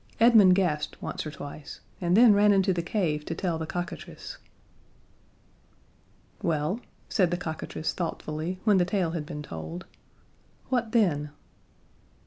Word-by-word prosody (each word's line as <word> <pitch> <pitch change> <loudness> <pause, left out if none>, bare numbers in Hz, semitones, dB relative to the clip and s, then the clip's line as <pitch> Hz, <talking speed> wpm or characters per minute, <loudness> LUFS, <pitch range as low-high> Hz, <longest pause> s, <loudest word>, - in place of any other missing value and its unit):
Edmund 220 -5 +7
gasped 165 -6 -1
once - - -4
or - - -3
twice, 145 0 -9 0.2
and 175 +2 +3
then 235 -2 +8
ran 205 +1 +5
into 195 -1 +3
the 175 - -1
cave 170 -5 -1
to 165 - -3
tell 170 -2 -1
the 160 - -4
cockatrice. 175 +1 -6 2.0
"Well," 160 +5 0 0.3
said 185 -6 +2
the 175 - -1
cockatrice 160 -2 -4
thoughtfully, 165 +1 -4
when 210 -3 +4
the 175 - +3
tale 185 -3 0
had 160 -3 -4
been 150 0 -6
told. 80 - -7 0.8
"What 245 -3 0
then?" 165 -11 +2
175 Hz, 135 wpm, -27 LUFS, 155-195 Hz, 2.0 s, then